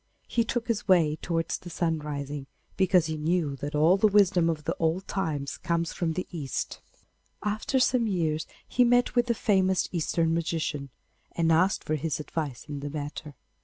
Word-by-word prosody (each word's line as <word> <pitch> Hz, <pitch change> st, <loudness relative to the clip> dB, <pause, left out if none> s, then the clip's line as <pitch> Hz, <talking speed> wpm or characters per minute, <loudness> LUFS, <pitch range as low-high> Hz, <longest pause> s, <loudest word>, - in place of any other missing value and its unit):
He 235 Hz, -, +1 dB
took 235 Hz, +1 st, -2 dB
his 225 Hz, -3 st, -1 dB
way 165 Hz, -5 st, +4 dB
towards 165 Hz, 0 st, -2 dB
the 175 Hz, -, -10 dB
sun 165 Hz, -1 st, 0 dB
rising, 145 Hz, -1 st, -5 dB, 0.3 s
because 185 Hz, -3 st, +4 dB
he 160 Hz, 0 st, -3 dB
knew 155 Hz, -2 st, 0 dB
that 145 Hz, +2 st, -4 dB
all 160 Hz, +6 st, +5 dB
the 215 Hz, -, +5 dB
wisdom 195 Hz, -4 st, +4 dB
of 155 Hz, -2 st, -2 dB, 0.2 s
old 165 Hz, +4 st, 0 dB
time 160 Hz, -7 st, -2 dB, 0.2 s
comes 170 Hz, -1 st, -1 dB
from 165 Hz, -2 st, -1 dB
the 185 Hz, -, -3 dB
East. 150 Hz, -7 st, -4 dB, 0.6 s
After 215 Hz, +6 st, 0 dB
some 250 Hz, -2 st, +3 dB
years 160 Hz, -6 st, 0 dB, 0.2 s
he 250 Hz, -, +3 dB
met 245 Hz, 0 st, +3 dB
with 245 Hz, 0 st, +2 dB
a 235 Hz, -, +3 dB
famous 190 Hz, -3 st, +2 dB
Eastern 165 Hz, -1 st, +1 dB
magician, 160 Hz, -4 st, -2 dB, 0.4 s
and 165 Hz, -1 st, +2 dB
asked 180 Hz, +4 st, +3 dB
for 155 Hz, -, -2 dB
his 155 Hz, 0 st, -1 dB
advice 150 Hz, -4 st, -4 dB
in 145 Hz, -1 st, -6 dB
the 145 Hz, +1 st, -5 dB
matter. 145 Hz, 0 st, -6 dB
165 Hz, 175 wpm, -27 LUFS, 150-190 Hz, 0.6 s, all